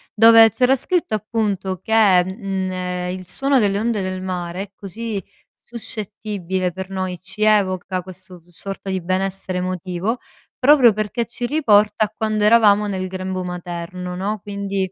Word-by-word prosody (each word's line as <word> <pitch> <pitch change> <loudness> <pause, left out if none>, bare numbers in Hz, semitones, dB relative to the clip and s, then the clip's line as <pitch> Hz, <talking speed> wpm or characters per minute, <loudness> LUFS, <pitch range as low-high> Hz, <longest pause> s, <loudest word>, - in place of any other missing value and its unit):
dove 225 0 +8
c'era 250 +4 +3
scritto 335 -2 -1
appunto 205 -4 -2
che, 220 +4 -4 0.3
mhmm, 190 -1 -3
ehm, 180 0 -3
il 185 -1 -11
suono 275 +6 +2
delle 200 -2 +1
onde 220 -1 0
del 185 0 -3
mare 180 0 -4
è 200 - -12
così 205 +1 -5 0.3
suscettibile 205 -5 -4
per 190 +1 -7
noi, 185 -2 -3
ci 190 +3 -2
evoca 190 -3 +2
questo 185 0 -12
v 170 - -31
sorta 195 +3 -6
di 190 -1 -1
benessere 185 +1 -2
emotivo, 185 +4 -2 0.4
proprio 265 -3 +6
perché 215 +3 -2
ci 240 +1 -4
riporta 215 -7 +3
a - - -8
quando 215 -1 -1
eravamo 210 -2 +5
nel 190 -2 -3
grembo 185 0 -4
materno, 180 0 -6
no, 205 +3 -2
quindi 200 -2 -3
195 Hz, 155 wpm, -20 LUFS, 185-215 Hz, 0.4 s, dove